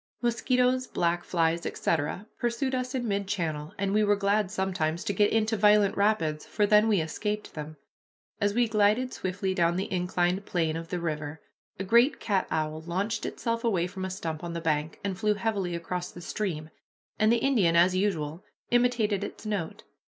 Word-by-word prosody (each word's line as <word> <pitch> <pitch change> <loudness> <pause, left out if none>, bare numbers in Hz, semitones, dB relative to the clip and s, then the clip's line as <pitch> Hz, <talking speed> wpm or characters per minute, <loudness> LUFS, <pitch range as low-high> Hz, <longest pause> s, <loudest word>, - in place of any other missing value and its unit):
Mosquitoes, 250 +2 +2
black 175 0 0
flies, 165 -1 +1
etc., 165 +5 -1
pursued 240 +3 -1
us 255 +1 -2
in 245 -2 -1
mid 200 -1 -1
channel, 160 -6 -2
and 195 0 -1
we 215 +1 +4
were 205 0 +4
glad 200 0 +1
sometimes 185 -3 -1
to 205 - -1
get 205 0 +3
into 220 0 +2
violent 210 -1 +4
rapids, 170 -7 +1
for 210 - 0
then 210 +1 +5
we 210 -4 +3
escaped 210 +7 -3
them. 155 0 -7 0.6
As 205 -1 +1
we 240 0 +3
glided 220 +4 +2
swiftly 190 +1 -2
down 170 -2 +2
the 190 +1 -2
inclined 180 +1 0
plane 165 -3 0
of 165 0 -5
the 180 +1 -3
river, 155 -2 -4 0.4
a 195 - -3
great 235 +8 +4
cat 200 -4 0
owl 155 0 -2
launched 190 +7 -2
itself 230 -1 -2
away 190 -7 +1
from 190 +1 -6
a 190 - -2
stump 165 -4 -5
on 170 -1 -4
the 170 - -3
bank, 155 -1 -1
and 195 -2 -3
flew 210 0 +2
heavily 200 -5 -1
across 175 +1 -4
the - - -11
stream, 165 -5 -3 0.5
and 215 +1 +4
the 235 - +4
Indian, 225 -10 +2
as 180 +2 +5
usual, 170 -5 -1 0.3
imitated 235 -5 +2
its 205 - -7
note. 205 -6 -3
195 Hz, 185 wpm, -28 LUFS, 170-215 Hz, 0.6 s, then